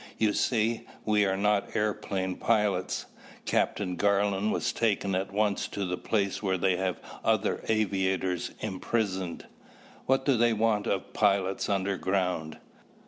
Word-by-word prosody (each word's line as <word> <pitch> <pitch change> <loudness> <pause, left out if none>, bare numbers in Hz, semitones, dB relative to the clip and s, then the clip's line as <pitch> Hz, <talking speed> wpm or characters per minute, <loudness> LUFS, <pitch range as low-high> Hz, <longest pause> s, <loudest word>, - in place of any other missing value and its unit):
You 110 -2 +2
see, 115 -1 0 0.2
we 105 -1 +3
are 95 0 0
not 105 0 +1
airplane 100 -3 -1
pilots. 105 -5 +1 0.4
Captain 90 -3 0
Garland 100 +1 +2
was - - 0
taken 100 -4 0
at 95 +2 -1
once 105 0 +1
to 100 - -3
the 90 0 -1
place 100 +1 -1
where 95 -2 0
they 95 0 +2
have 95 -2 -1 0.2
other 110 -2 +1
aviators 95 -4 0
imprisoned." 95 -2 -2 0.6
"What 135 0 +2
do 140 - +4
they 120 0 +4
want 110 -1 +1
of 95 - -2
pilots 100 -2 +1
underground?" 95 -4 -1
100 Hz, 135 wpm, -28 LUFS, 95-110 Hz, 0.6 s, do